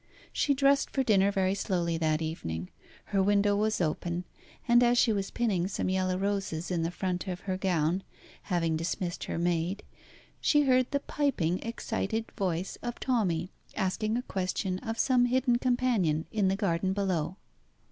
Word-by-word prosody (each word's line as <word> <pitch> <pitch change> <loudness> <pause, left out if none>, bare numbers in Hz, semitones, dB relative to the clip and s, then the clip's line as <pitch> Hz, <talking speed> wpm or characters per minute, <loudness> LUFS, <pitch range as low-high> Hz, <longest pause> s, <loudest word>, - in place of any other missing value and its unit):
She 280 - +2
dressed 275 +1 +3
for 270 - 0
dinner 200 -4 +4
very 190 -1 +1
slowly 175 -4 -1
that 155 0 +1
evening. 90 - -4 0.4
Her 195 - +4
window 205 +1 +3
was 215 +1 +1
open, 170 +1 -1 0.4
and 240 0 +6
as 245 0 +4
she 230 -2 +4
was 195 -1 -2
pinning 195 -7 0
some 190 - -2
yellow 185 -1 0
roses 195 -4 -2
in 175 -2 0
the 165 - 0
front 180 +1 -3
of 180 0 -4
her 190 -2 -2
gown, 180 -2 +1 0.5
having 165 -3 +1
dismissed 175 +2 -3
her - - -3
maid, 175 +3 0 0.6
she 295 -1 +4
heard 255 -2 +3
the 280 0 -1
piping, 185 - 0
excited 225 -1 -3
voice 185 -3 -2
of 240 0 -5
Tommy 185 -9 0 0.2
asking 215 +4 0
a 250 - -2
question 185 -2 -2
of 225 0 -4
some 250 -1 +3
hidden 245 -1 +2
companion 240 -12 +1
in 210 -3 +1
the 190 - +2
garden 190 -2 0
below. 185 -3 -1
190 Hz, 165 wpm, -29 LUFS, 175-230 Hz, 0.6 s, and